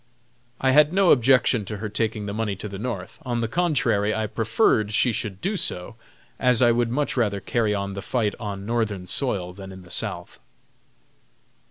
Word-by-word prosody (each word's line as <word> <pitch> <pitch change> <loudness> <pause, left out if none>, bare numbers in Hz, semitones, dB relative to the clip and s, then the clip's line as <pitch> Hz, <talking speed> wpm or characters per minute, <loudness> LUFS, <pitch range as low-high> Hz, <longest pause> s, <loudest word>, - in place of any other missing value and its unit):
I 130 - +2
had 150 +2 +5
no 190 -1 +4
objections 125 -4 +4
to 105 - -4
her 105 +2 -4
taking 110 0 -2
the 100 - -4
money 105 -2 -2
to 95 - -7
the 100 -1 -7
North. 115 -1 -5
On 120 -2 -2
the 115 - 0
contrary, 120 -9 +1
I 110 - -1
preferred 110 -1 +1
she 125 - +3
should 105 -3 -4
do 200 +3 -1
so, 100 - -2 0.4
as 125 -2 +4
I 120 -2 +5
would 120 0 +1
much 145 +5 -1
rather 105 -5 0
carry 110 -1 0
on 100 0 -3
the 100 - -5
fight 105 -1 -1
on 100 -3 -5
Northern 110 -5 -1
soil 90 -5 -1
than 95 0 -10
in 95 -1 -11
the 85 - -15
South. - - -4
110 Hz, 190 wpm, -24 LUFS, 100-125 Hz, 0.4 s, had